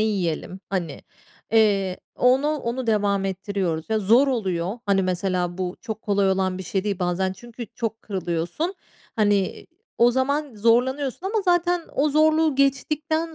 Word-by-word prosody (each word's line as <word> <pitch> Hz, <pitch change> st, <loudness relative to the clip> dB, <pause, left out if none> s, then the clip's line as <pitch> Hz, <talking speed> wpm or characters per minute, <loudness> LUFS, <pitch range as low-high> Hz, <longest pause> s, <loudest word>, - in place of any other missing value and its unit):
yiyelim?" 190 Hz, -3 st, -1 dB
Hani. 175 Hz, -6 st, -3 dB, 0.5 s
Eee, 200 Hz, -4 st, +3 dB, 0.2 s
onu, 260 Hz, +4 st, +3 dB
onu 260 Hz, -4 st, -2 dB
devam 200 Hz, -3 st, +1 dB
ettiriyoruz 190 Hz, -3 st, -2 dB
ve 220 Hz, -, +2 dB
zor 230 Hz, +8 st, +4 dB
oluyor. 190 Hz, -4 st, -1 dB
Hani, 195 Hz, -1 st, +3 dB
mesela 180 Hz, -1 st, -1 dB
bu 180 Hz, -1 st, -3 dB
çok 220 Hz, -2 st, -6 dB
kolay 200 Hz, -2 st, +2 dB
olan 190 Hz, -1 st, 0 dB
bir -, -, -5 dB
şey 190 Hz, +2 st, -2 dB
değil 200 Hz, -2 st, -1 dB
bazen. 185 Hz, +1 st, 0 dB
Çünkü 235 Hz, +3 st, -9 dB
çok 225 Hz, -1 st, -4 dB
kırılıyorsun. 185 Hz, -, -2 dB, 0.4 s
Hani, 205 Hz, -3 st, +1 dB, 0.3 s
o 240 Hz, +1 st, +6 dB
zaman 280 Hz, +2 st, -1 dB
zorlanıyorsun 255 Hz, -, +1 dB
ama 425 Hz, +1 st, 0 dB
zaten 350 Hz, -1 st, +2 dB
o 295 Hz, +2 st, +2 dB
zorluğu 310 Hz, 0 st, +3 dB
geçtikten 305 Hz, +4 st, 0 dB
215 Hz, 145 wpm, -24 LUFS, 190-275 Hz, 0.5 s, o